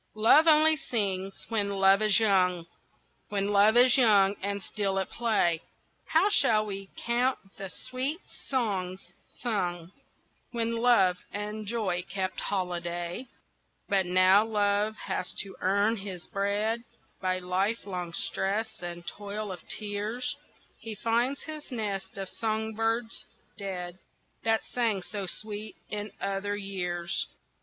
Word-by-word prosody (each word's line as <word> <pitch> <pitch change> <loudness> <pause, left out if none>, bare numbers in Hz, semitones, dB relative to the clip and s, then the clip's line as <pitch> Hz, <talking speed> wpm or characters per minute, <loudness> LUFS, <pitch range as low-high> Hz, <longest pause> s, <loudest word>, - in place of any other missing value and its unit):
LOVE 230 +9 +6
only 315 0 +7
sings 195 -10 -2
when 210 -3 +1
Love 195 +1 +5
is 215 0 +5
young, 180 -5 +3 0.6
When 200 0 0
Love 205 +3 +5
is 250 +1 +7
young 205 -4 +5
and 200 0 -2
still 195 -2 -1
at 190 - -1
play, 205 -8 +1 0.5
How 325 +5 +4
shall 215 - +4
we 195 -1 -6 0.2
count 245 +2 +2 0.2
the 195 -1 -6
sweet 255 - -2 0.3
songs 190 -8 -2 0.2
sung 180 -7 -2 0.6
When 230 -1 0
Love 230 -7 +4
and 210 +1 -5
Joy 200 -6 0
kept 190 0 -2
holiday? 175 +2 -3 0.6
But 195 -2 +2
now 185 +3 +6
Love 210 -1 +1
has 190 -2 -2
to 195 - -11
earn 200 +4 +2
his 190 -3 -7
bread 210 +4 -1 0.4
By 185 -1 +1
lifelong 185 -1 -2
stress 200 +5 -1
and 175 -1 -6
toil 205 +2 -5
of 180 - -6
tears, 215 +7 -2 0.4
He 225 -1 -6
finds 235 +6 0
his 310 -1 -7
nest 205 -6 -3
of 195 -1 -4
song 220 +2 -2
birds 225 +1 -1 0.3
dead 185 -3 -5 0.4
That 225 0 +2
sang 225 -6 -1
so 200 -1 -4
sweet 215 +2 -5 0.2
in 210 0 -4
other 200 +1 -2
years. 180 -4 -2
205 Hz, 130 wpm, -29 LUFS, 190-225 Hz, 0.6 s, only